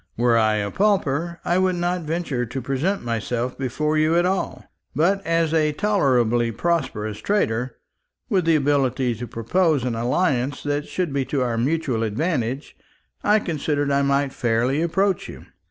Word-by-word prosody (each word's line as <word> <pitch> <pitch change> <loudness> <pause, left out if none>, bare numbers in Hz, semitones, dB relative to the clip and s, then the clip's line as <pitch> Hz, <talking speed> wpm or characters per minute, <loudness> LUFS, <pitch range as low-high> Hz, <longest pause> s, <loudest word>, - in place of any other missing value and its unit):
Were 120 0 +3
I 110 -1 +3
a 100 -1 -2
pauper, 170 -5 0
I 175 +1 +2
would 185 -1 +2
not 175 +1 -1
venture 155 -5 -2
to 125 +3 -4
present 135 +10 -1
myself 120 +2 -2
before 150 +4 -1
you 155 +2 +3
at 175 +1 +3
all; 190 +1 -2 0.3
but 190 +7 +2
as 165 -1 +1
a 155 -2 +2
tolerably 125 - +2
prosperous 110 -9 -2
trader, 125 - 0 0.5
with 185 -4 +1
the 165 -1 +4
ability 135 -4 +1
to 120 +2 -6
propose 140 - +1
an 125 -2 -1
alliance 130 +3 0
that 145 0 -2
should 175 -6 -2
be 140 -1 +1
to 135 -1 -1
our 120 -2 -1
mutual 130 0 0
advantage, 130 - -2 0.5
I 210 +1 +4
considered 150 -6 -1
I 140 0 +3
might 140 0 +1
fairly 120 +5 +1
approach 190 +3 0
you." - - -10
145 Hz, 160 wpm, -23 LUFS, 120-170 Hz, 0.5 s, the